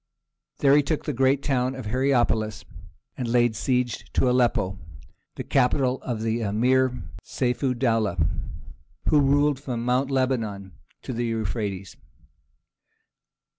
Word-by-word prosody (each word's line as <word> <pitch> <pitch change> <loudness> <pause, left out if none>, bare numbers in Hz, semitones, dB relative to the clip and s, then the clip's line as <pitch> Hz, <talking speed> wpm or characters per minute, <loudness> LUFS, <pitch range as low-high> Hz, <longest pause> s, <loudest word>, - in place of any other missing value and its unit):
There 140 0 +4
he 145 - +6
took 150 +2 -2
the 150 - -2
great 135 +2 +2
town 130 -1 0
of 130 -3 -7
Hierapolis, 120 -4 0 0.5
and 125 - -4
laid 120 -1 +2
siege 125 -1 -1
to - - +2
Aleppo, 120 -7 +1 0.6
the - - -5
capital 130 0 +1
of 115 -3 -4
the 115 +1 -1
Emir 125 +4 +1 0.2
Seyf 125 -1 -2
ud 130 -2 +1
dowleh, 115 -7 +1 0.9
who 150 - +5
ruled 145 0 +2
from 120 -4 -4
Mount 125 +2 +1
Lebanon 115 -8 -1 0.3
to 130 - -5
the 120 0 -2
Euphrates. 105 -4 -3
125 Hz, 130 wpm, -25 LUFS, 115-130 Hz, 0.9 s, he